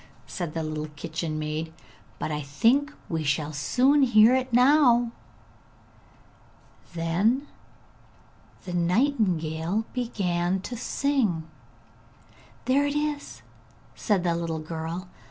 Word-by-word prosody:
said 170 -5 -5
the 165 - -1
little 155 0 -4
kitchen 155 +1 -4
maid. 155 +1 -3 0.5
'But - - -3
I 150 0 -2
think 235 - +2 0.2
we 160 -2 -2
shall 150 +1 -1
soon 260 - +3
hear 235 -2 +6
it 260 0 0
now!' 245 -2 +5 1.8
Then 190 - +1 1.2
the 180 - -5
nightingale 180 - +1
began 190 -7 -1
to 245 - -6
sing. 230 - 0 1.2
'There 280 +3 +3
it 285 - -2
is!' 295 -1 -3 0.5
said 200 -5 0
the 170 -2 +1
little 170 -1 -2
girl. 165 +3 -5
180 Hz, 105 wpm, -26 LUFS, 160-250 Hz, 1.8 s, hear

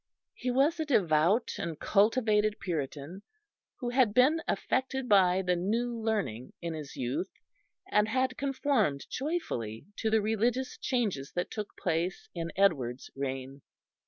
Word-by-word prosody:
He 250 - -4
was 280 +7 +2
a 315 - 0
devout 190 - +3
and 165 -3 -4
cultivated 215 0 +3
Puritan, 155 +1 -4 0.6
who 245 -3 -3
had 245 -4 +3
been 295 +6 +5
affected 265 0 -1
by 190 -3 +5
the 180 -1 +2
New 230 +7 -1
Learning 205 - -2
in 170 -1 -4
his 150 -3 -7
youth, 130 +9 -2 0.6
and 210 0 +4
had 260 +3 0
conformed 265 - 0
joyfully 255 - -3
to 220 - 0
the 220 0 +4
religious 230 +4 0
changes 205 - -1
that 175 - -2
took 210 -2 -6
place 175 0 -2
in 165 -1 -4
Edward's 135 -11 +1
reign. 135 0 -4
205 Hz, 135 wpm, -30 LUFS, 160-245 Hz, 0.6 s, been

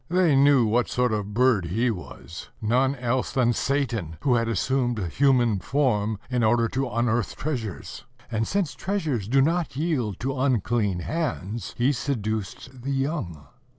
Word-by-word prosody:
They 175 -4 +3
knew 135 -2 +5
what 120 +3 +1
sort 125 -2 +1
of 105 - +1
a - - -4
bird 105 -1 +2
he 115 +8 +1
was, 90 -3 -9
none 130 +5 +2
else 125 0 -1
than 120 -2 +2
Satan, 115 - -1
who 130 - +2
had 115 -1 +2
assumed 120 +2 0
human 120 - +2
form 110 - 0
in 125 -2 0
order 115 +1 +3
to 130 +2 -2
unearth 120 -3 0
treasures; 120 - -5 0.3
and, 110 -1 0
since 195 -6 -1
treasures 155 - -2
do 135 +3 +4
not 165 0 0
yield 135 - -1
to 135 +2 -2
unclean 115 -7 +1
hands, 115 - -3
he 125 +4 +3
seduced 120 -1 -4
the 135 - -5
young. 135 - -2
120 Hz, 155 wpm, -25 LUFS, 110-135 Hz, 0.3 s, knew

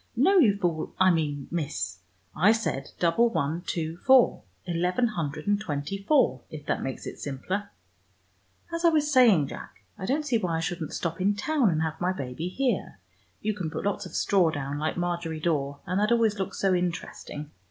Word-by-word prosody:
No, 370 +11 +5
you 210 - +5
fool, 170 -5 -2
I 185 0 +6
mean 145 -4 -1
Miss, 100 - -3 0.4
I 195 +8 +5
said 185 -12 -2
double 180 +8 +3
one 160 -3 -1
two 165 -1 -2
four, 260 +4 +5 0.2
eleven 180 +7 +1
hundred 155 -6 -4
and 205 0 +1
twenty 150 +1 -3
four, 270 +7 +3
if 150 -2 -9
that - - -1
makes 135 - -5
it - - -7
simpler. 185 +9 -3 1.0
As 335 +1 -2
I 340 - +7
was 300 -2 +1
saying, 215 - +5
Jack, - - -10 0.2
I 190 - -4
don't 295 +5 0
see 245 -5 +2
why 170 -5 -1
I - - -1
shouldn't 165 -1 -3
stop 170 +1 -3
in 200 +2 +2
town, 265 +2 +2
and 160 -2 +1
have 160 +1 -4
my 180 +1 +1
baby 140 +1 -4
here. 240 - -1 0.4
You 215 +1 0
can 185 -6 -4
put - - -5
lots 205 -1 -1
of - - -11
straw 185 -5 +3
down, 145 -2 -3
like 155 +3 -2
Margery 175 -2 -2
Daw, 145 -4 -1
and 185 +1 0
that 210 +2 +2
always 225 -3 +3
looks 190 - -3
so 195 -1 +2
interesting. 165 -4 -3
180 Hz, 195 wpm, -27 LUFS, 155-210 Hz, 1.0 s, I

